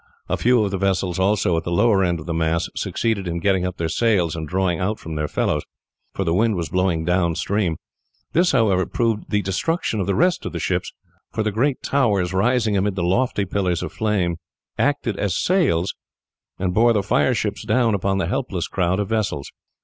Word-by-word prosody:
A - - 0
few 120 -2 +3
of 100 - -1
the 95 - -2
vessels 95 -2 0
also 95 -2 +2
at 80 - -2
the - - -4
lower 95 +3 +3
end 85 -2 0
of 75 - -9
the 85 - -3
mass 80 0 0
succeeded 110 -5 -1
in 85 0 -2
getting 95 0 +1
up 90 - -6
their 85 - -1
sails 90 -4 +1
and 80 -1 -5
drawing 90 -1 0
out 105 +4 -1
from 80 - -8
their 75 -1 -2
fellows, - - 0 0.5
for 95 - -1
the 85 -3 0
wind 110 +3 +2
was 85 -4 -3
blowing 90 -2 0
down 90 -1 +1
stream. 100 -4 0 0.6
This, 175 +2 +3
however, 105 -8 +2
proved 115 -3 -1
the 105 -1 +1
destruction 110 - -1
of 95 - -1
the 100 - +1
rest 180 +1 +2
of - - -5
the - - -3
ships, - - -1 0.4
for 110 - -1
the 105 - 0
great 130 +6 0
towers 100 -10 +1
rising 110 +2 +2
amid 100 0 0
the 90 - -1
lofty 100 +3 +1
pillars 90 -3 -1
of - - -6
flames 95 -6 0 0.4
acted 135 -6 0
as 100 -4 0
sails 130 - +1 0.6
and 90 -1 -1
bore 115 +4 +4
the 105 -3 +1
fire 125 +5 +2
ships 105 -1 -2
down 115 +1 +2
upon 95 0 0
the 95 - 0
helpless - - -2
crowd 90 0 0
of 105 - -1
vessels. 105 -10 -2
95 Hz, 210 wpm, -22 LUFS, 90-110 Hz, 0.6 s, bore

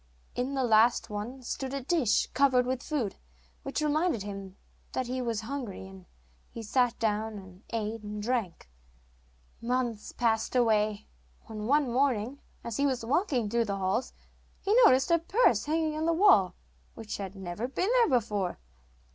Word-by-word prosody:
In 255 +3 -2
the 265 - +1
last 230 -1 +3
one 235 +6 -5
stood 265 +2 -4
a 275 - -3
dish, 285 - +2
covered 260 -2 +4
with 255 0 -2
food, 255 -11 -2 0.4
which 305 - -3
reminded 300 - +1
him 195 -2 -8 0.4
that 260 - -1
he 255 +1 -3
was 230 -3 -2
hungry, 225 -6 -6
and 190 -2 -14 0.4
he 230 - -8
sat 245 +2 +1
down 220 -1 -1
and 190 -1 -13
ate 225 0 -3
and 210 0 -6
drank. 215 - -2 0.9
Months 240 -3 -2
passed 225 0 0
away, 215 -3 +2 0.4
when, 215 -1 -6
one 290 +1 +3
morning, 250 0 0 0.2
as 235 -2 -4
he 285 - +2
was 255 -4 -2
walking 265 - +1
through 235 +2 +1
the 200 -2 -2
halls, 195 +6 -1 0.5
he 400 - 0
noticed 265 0 +4
a 335 - +5
purse 335 - +2
hanging 310 0 0
on 315 +1 -1
the 335 - +3
wall, 325 - +5 0.4
which 225 -2 -6
had 195 -1 -6
never 190 +4 -4
been 365 +9 -1
there 475 - +4
before. 210 -7 0
235 Hz, 165 wpm, -29 LUFS, 210-270 Hz, 0.9 s, a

